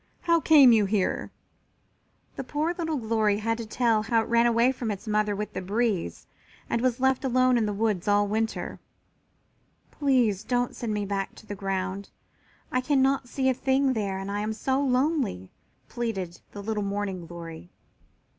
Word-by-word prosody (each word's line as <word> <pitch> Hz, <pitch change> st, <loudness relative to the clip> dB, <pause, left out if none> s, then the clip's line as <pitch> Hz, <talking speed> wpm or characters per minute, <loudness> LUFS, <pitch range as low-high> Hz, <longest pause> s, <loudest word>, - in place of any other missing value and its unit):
How 335 Hz, -1 st, +3 dB
came 295 Hz, -6 st, +7 dB
you 220 Hz, -3 st, +4 dB
here?" 195 Hz, -1 st, -1 dB, 1.1 s
The -, -, -4 dB
poor 300 Hz, +6 st, -1 dB
little 325 Hz, -3 st, -2 dB
Glory 220 Hz, -3 st, +1 dB
had 225 Hz, +2 st, -1 dB
to 230 Hz, -, -5 dB
tell 225 Hz, -1 st, +2 dB
how 225 Hz, +1 st, +1 dB
it -, -, -9 dB
ran 235 Hz, 0 st, +4 dB
away 235 Hz, +2 st, +3 dB
from 245 Hz, -3 st, -4 dB
its 205 Hz, +1 st, -5 dB
mother 210 Hz, -1 st, +1 dB
with 210 Hz, +1 st, -5 dB
the -, -, -4 dB
breeze 205 Hz, -1 st, -1 dB, 0.4 s
and 230 Hz, -, -1 dB
was 255 Hz, 0 st, +1 dB
left 265 Hz, 0 st, +2 dB
alone 255 Hz, -1 st, +3 dB
in 225 Hz, -3 st, +2 dB
the -, -, -1 dB
woods 205 Hz, -3 st, -1 dB
all 205 Hz, 0 st, +3 dB
winter. 220 Hz, +2 st, -2 dB, 1.1 s
"Please 250 Hz, -9 st, +1 dB
don't 245 Hz, +1 st, -1 dB
send 235 Hz, -2 st, -4 dB
me 210 Hz, -1 st, -1 dB
back 195 Hz, -1 st, -3 dB
to -, -, -15 dB
the 210 Hz, -, -6 dB
ground. 195 Hz, 0 st, -3 dB, 0.6 s
I 255 Hz, -, +1 dB
cannot 270 Hz, -1 st, +1 dB
see 265 Hz, +1 st, -1 dB
a 260 Hz, -, +4 dB
thing 265 Hz, +1 st, +1 dB
there 200 Hz, -4 st, -2 dB
and 195 Hz, +1 st, -5 dB
I 205 Hz, -, -2 dB
am 215 Hz, +1 st, -2 dB
so 265 Hz, +5 st, 0 dB
lonely," 260 Hz, -, 0 dB, 0.4 s
pleaded 195 Hz, -8 st, -4 dB
the 205 Hz, -, -8 dB
little 215 Hz, 0 st, -2 dB
Morning 200 Hz, -3 st, -3 dB
glory. 165 Hz, -, -9 dB
225 Hz, 175 wpm, -26 LUFS, 205-255 Hz, 1.1 s, came